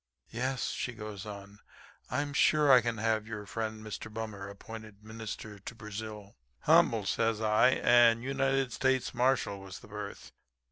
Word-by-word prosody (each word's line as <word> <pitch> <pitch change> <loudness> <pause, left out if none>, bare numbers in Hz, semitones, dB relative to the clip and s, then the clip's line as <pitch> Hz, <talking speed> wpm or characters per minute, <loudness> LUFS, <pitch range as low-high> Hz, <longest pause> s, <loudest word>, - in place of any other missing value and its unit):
Yes,' 130 +3 -1
she 125 - -3
goes 105 -2 -7
on, 100 0 -9 0.5
'I 130 +4 0
am 145 -1 -6
sure 150 0 +4
I 125 -2 +8
can 115 0 -2
have 110 0 0
your 105 -2 -6
friend, 110 +1 -4
Mr. 110 +1 -6
Bummer, 105 -3 -5
appointed 110 0 -10
Minister 110 -1 -7
to 110 +4 -8
Brazil.' 105 -2 -7 0.3
"'Humble,' 110 -3 +4
says 115 +3 +1
I. 110 +2 +4
'And 120 -1 +5
United 135 -1 0
States 130 -1 +1
Marshal 125 -5 +1
was 95 -1 -9
the - - -14
berth.' 105 -1 -7
110 Hz, 155 wpm, -31 LUFS, 105-120 Hz, 0.5 s, I